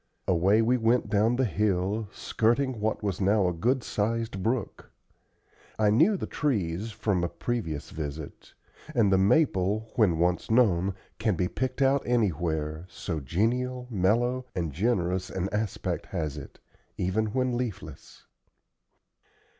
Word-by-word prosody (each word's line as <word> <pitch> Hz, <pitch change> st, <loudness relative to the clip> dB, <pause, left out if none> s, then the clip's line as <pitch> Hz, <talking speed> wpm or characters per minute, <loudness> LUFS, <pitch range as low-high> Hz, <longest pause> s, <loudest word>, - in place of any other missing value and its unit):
Away 95 Hz, +5 st, +3 dB
we 125 Hz, +3 st, +3 dB
went 115 Hz, +1 st, +1 dB
down 110 Hz, +3 st, +3 dB
the 130 Hz, +1 st, +2 dB
hill, 105 Hz, +1 st, 0 dB
skirting 120 Hz, +2 st, 0 dB
what 110 Hz, +1 st, -1 dB
was 100 Hz, -2 st, -2 dB
now 100 Hz, 0 st, +3 dB
a 90 Hz, -, 0 dB
good 120 Hz, +9 st, 0 dB
sized 110 Hz, -1 st, -2 dB
brook. 115 Hz, +1 st, -2 dB, 0.9 s
I 105 Hz, -1 st, +3 dB
knew 165 Hz, -, +4 dB
the -, -, -4 dB
trees, 105 Hz, -, -1 dB
from 100 Hz, -3 st, -1 dB
a 85 Hz, -, 0 dB
previous 85 Hz, -13 st, -4 dB
visit; 75 Hz, -1 st, -7 dB, 0.4 s
and 110 Hz, -5 st, +4 dB
the 95 Hz, -, +4 dB
maple, 105 Hz, -, +2 dB
when 100 Hz, -8 st, +4 dB
once 90 Hz, +2 st, 0 dB
known, 100 Hz, -6 st, +3 dB, 0.2 s
can 110 Hz, -4 st, +1 dB
be 90 Hz, +1 st, 0 dB
picked 130 Hz, +6 st, -2 dB
out 135 Hz, +1 st, +3 dB
anywhere, 80 Hz, -8 st, -1 dB
so 85 Hz, -2 st, -4 dB
genial, 125 Hz, -, -1 dB
mellow, 120 Hz, +6 st, +1 dB
and 85 Hz, -5 st, -2 dB
generous 95 Hz, -, 0 dB
an 95 Hz, +1 st, -2 dB
aspect 105 Hz, -1 st, -2 dB
has 75 Hz, -4 st, -3 dB
it, -, -, -10 dB, 0.4 s
even 100 Hz, +5 st, 0 dB
when 125 Hz, +2 st, 0 dB
leafless. 120 Hz, -6 st, -6 dB
105 Hz, 140 wpm, -27 LUFS, 90-120 Hz, 0.9 s, knew